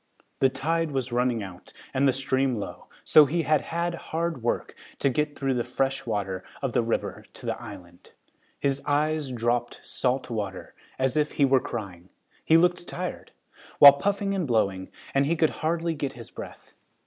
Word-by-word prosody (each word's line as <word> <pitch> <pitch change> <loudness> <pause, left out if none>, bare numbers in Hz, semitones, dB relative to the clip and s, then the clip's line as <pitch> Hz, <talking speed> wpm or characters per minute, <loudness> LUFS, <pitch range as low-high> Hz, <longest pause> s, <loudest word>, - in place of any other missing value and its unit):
The 135 - +5
tide 165 +4 -1
was 130 -3 -2
running 120 -2 +1
out 90 -2 -11 0.2
and 140 +1 +3
the - - +5
stream 135 0 0
low, 105 - -6 0.2
so 155 - +7
he 165 +4 0
had 155 0 +3
had 170 +1 -2
hard 165 -3 -3
work 120 - -1 0.2
to 140 - +1
get 150 +2 -1
through 135 -1 0
the 120 -1 0
fresh 135 +1 -1
water 95 -4 -2 0.2
of 135 -4 -2
the - - +3
river 115 0 -2
and - - -27
to - - -11
the - - -3
island. 90 -3 -11 0.5
His 140 0 0
eyes 150 -1 +1
dropped 120 0 -1
salt 130 +1 -1
water, 100 -4 -4 0.2
as 130 -1 0
if 150 -1 +1
he 140 - +3
were 135 -1 +4
crying. 95 -6 -6 0.3
He 160 - +5
looked 175 +1 +2
tired, 180 0 -5 0.5
while 140 -1 +11
puffing 200 +6 -1
and 185 -5 -1
blowing, 100 -6 0 0.2
and 140 0 +3
he 165 - +2
could 160 -1 +2
hardly 165 +1 0
get 140 -3 -3
his 115 -2 -11
breath. - - -10
135 Hz, 185 wpm, -26 LUFS, 120-155 Hz, 0.5 s, while